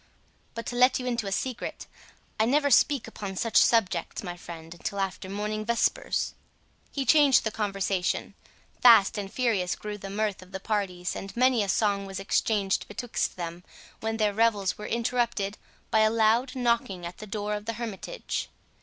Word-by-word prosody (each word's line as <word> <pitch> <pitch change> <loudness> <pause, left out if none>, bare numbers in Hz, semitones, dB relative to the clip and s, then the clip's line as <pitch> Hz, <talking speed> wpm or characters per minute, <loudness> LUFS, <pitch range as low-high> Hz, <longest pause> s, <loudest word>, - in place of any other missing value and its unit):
—But 230 -1 -5
to 245 - -4
let 250 +1 +5
you 250 - -5
into 235 -4 -1
a - - -3
secret, 250 +4 -3 0.5
I 220 - +4
never 285 +4 +2
speak 275 +1 +4
upon 195 -2 -6
such 225 +4 +1
subjects, 225 -4 +2
my 175 -2 -5
friend, 165 -2 -9
until 195 +3 -5
after 190 -1 -3
morning 210 +2 -3
vespers." 235 - 0 0.6
He 275 -2 -2
changed 290 -1 +6
the 220 - -1
conversation; 195 -3 -1 0.5
fast 230 -5 +7
and 195 -1 -5
furious 215 -8 0
grew 210 0 -6
the 195 - -7
mirth 205 -1 -1
of 185 +1 -15
the 190 - -3
parties, 190 -4 -2
and 195 +3 -7
many 255 -2 +4
a 200 - -1
song 200 -1 +1
was 195 0 -5
exchanged 195 0 0
betwixt 230 +3 -3
them, 175 0 -6 0.4
when 225 0 -2
their 210 -2 +2
revels 205 -4 +2
were 210 - -7
interrupted 235 -4 -1 0.3
by 220 - +4
a 215 0 +5
loud 230 +4 +2
knocking 235 -8 0
at 170 - -8
the 215 - -8
door 210 0 -3
of 210 0 -4
the 230 - -2
hermitage. 235 - -5
210 Hz, 175 wpm, -27 LUFS, 195-235 Hz, 0.6 s, fast